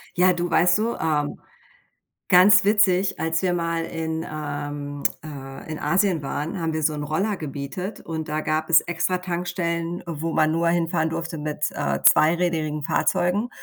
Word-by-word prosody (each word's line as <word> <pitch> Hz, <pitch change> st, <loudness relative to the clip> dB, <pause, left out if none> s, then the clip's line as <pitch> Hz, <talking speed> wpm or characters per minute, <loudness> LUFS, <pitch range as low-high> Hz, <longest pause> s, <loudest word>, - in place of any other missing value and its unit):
Ja, 180 Hz, +1 st, +5 dB
du, 175 Hz, 0 st, -2 dB
weißt 175 Hz, +2 st, +4 dB
du, 230 Hz, +2 st, -1 dB
ähm, 150 Hz, -2 st, -1 dB, 0.9 s
ganz 185 Hz, +1 st, +7 dB
witzig, 200 Hz, -2 st, +3 dB
als 160 Hz, +2 st, 0 dB
wir 185 Hz, -, +1 dB
mal 165 Hz, -1 st, -1 dB
in, 160 Hz, 0 st, -4 dB
ähm, 145 Hz, -1 st, -5 dB, 0.2 s
äh 140 Hz, -3 st, -8 dB, 0.2 s
in 155 Hz, -, -4 dB
Asien 175 Hz, +1 st, +1 dB
waren, 150 Hz, +6 st, -4 dB
haben 165 Hz, -1 st, -1 dB
wir 155 Hz, -, -2 dB
so 155 Hz, 0 st, +2 dB
'n 150 Hz, -, -4 dB
Roller 190 Hz, +8 st, -1 dB
gemietet 155 Hz, +6 st, -6 dB
und 160 Hz, -2 st, -5 dB
da 155 Hz, +1 st, -1 dB
gab 155 Hz, 0 st, -1 dB
es 165 Hz, -, +7 dB
extra 175 Hz, +2 st, -1 dB
Tankstellen, 175 Hz, -1 st, -3 dB
wo 165 Hz, 0 st, -4 dB
man 155 Hz, 0 st, +2 dB
nur 165 Hz, +1 st, +1 dB
hinfahren 165 Hz, -2 st, 0 dB
durfte 165 Hz, -1 st, -4 dB
mit, 150 Hz, 0 st, -3 dB
äh, -, -, -2 dB
zweirädrigen 160 Hz, -2 st, +3 dB
Fahrzeugen. 185 Hz, +10 st, +1 dB
165 Hz, 165 wpm, -23 LUFS, 155-180 Hz, 0.9 s, ganz